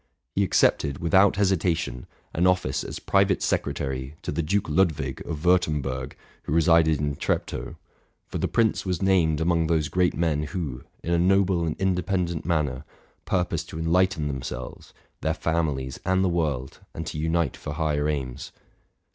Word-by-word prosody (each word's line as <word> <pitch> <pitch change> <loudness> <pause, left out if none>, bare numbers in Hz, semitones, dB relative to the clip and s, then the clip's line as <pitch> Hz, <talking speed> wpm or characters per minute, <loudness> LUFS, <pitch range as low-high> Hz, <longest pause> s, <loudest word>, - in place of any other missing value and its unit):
He - - +2
accepted, 70 -1 +2
without 95 +4 +4
hesitation, 85 -10 0 0.3
an 90 +3 +2
office 90 -8 +1
as - - -6
pri 100 0 +3
vate 95 -1 0
secretary 65 +1 -2
to - - -3
the 85 - -1
Duke 100 +6 0
Ludwig 75 -5 +1
of 80 0 -5
Wurtemberg, 75 -7 +1 0.3
who 70 - -4
re 85 - +5
sided 80 -3 +4
in 75 -1 -1
Treptow; - - -2 0.5
for - - -5
the - - +1
prince 115 -2 +1
was 90 -3 -1
named 85 -6 +3
among 85 0 +2
those 80 -3 +1
great 90 -1 +2
men 80 -3 +1
who, 75 -5 -4 0.2
in 85 - -1
a 85 - +3
noble 95 -1 +3
and 80 - -3
independent 90 -3 0
manner, 75 -6 0 0.4
purposed 85 -3 -1
to - - -7
enlighten 80 -1 +2
themselves, 65 -2 -6 0.3
their - - 0
families, 75 -6 -1
and 95 +1 +2
the 95 - +2
world, 75 -7 -2 0.2
and - - -4
to 75 - -5
unite 80 +1 0
for 75 - -6
higher 75 -1 0
aims. 70 -3 -4
80 Hz, 165 wpm, -25 LUFS, 75-90 Hz, 0.5 s, re